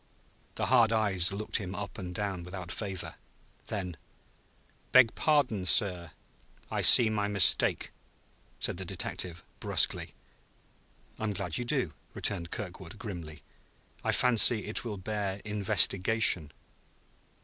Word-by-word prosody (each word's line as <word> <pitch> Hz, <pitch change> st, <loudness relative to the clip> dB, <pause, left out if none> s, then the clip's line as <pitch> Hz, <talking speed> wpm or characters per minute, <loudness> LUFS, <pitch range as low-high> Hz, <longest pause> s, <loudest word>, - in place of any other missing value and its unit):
The -, -, -2 dB
hard 115 Hz, -2 st, +3 dB
eyes 100 Hz, -5 st, +2 dB
looked 105 Hz, +2 st, -3 dB
him 95 Hz, -3 st, -6 dB
up 100 Hz, 0 st, -7 dB
and 90 Hz, -1 st, -8 dB
down 95 Hz, -3 st, -4 dB
without 90 Hz, 0 st, -8 dB
favor. 95 Hz, -3 st, -6 dB, 0.5 s
Then: 90 Hz, -5 st, -5 dB, 0.9 s
"Beg 125 Hz, -3 st, +5 dB
pardon, 140 Hz, -10 st, 0 dB
sir. 90 Hz, -4 st, +1 dB, 0.6 s
I -, -, -2 dB
see 120 Hz, -, +9 dB
my 105 Hz, -1 st, -2 dB
mistake," 100 Hz, -2 st, +3 dB, 0.7 s
said -, -, -1 dB
the 95 Hz, -, -6 dB
detective 85 Hz, -1 st, -6 dB, 0.2 s
brusquely. -, -, 0 dB, 1.0 s
"I -, -, -6 dB
am 105 Hz, -, -2 dB
glad 90 Hz, -2 st, -3 dB
you 120 Hz, -, -4 dB
do," 125 Hz, -, -1 dB, 0.2 s
returned 85 Hz, -4 st, -2 dB
Kirkwood 95 Hz, -1 st, -8 dB
grimly. 85 Hz, -8 st, -9 dB, 0.6 s
"I -, -, 0 dB
fancy 120 Hz, -3 st, +4 dB
it 105 Hz, -, -2 dB
will 110 Hz, -4 st, -6 dB
bear 100 Hz, 0 st, -4 dB
investigation." 105 Hz, -4 st, +2 dB
100 Hz, 125 wpm, -28 LUFS, 90-110 Hz, 1.0 s, see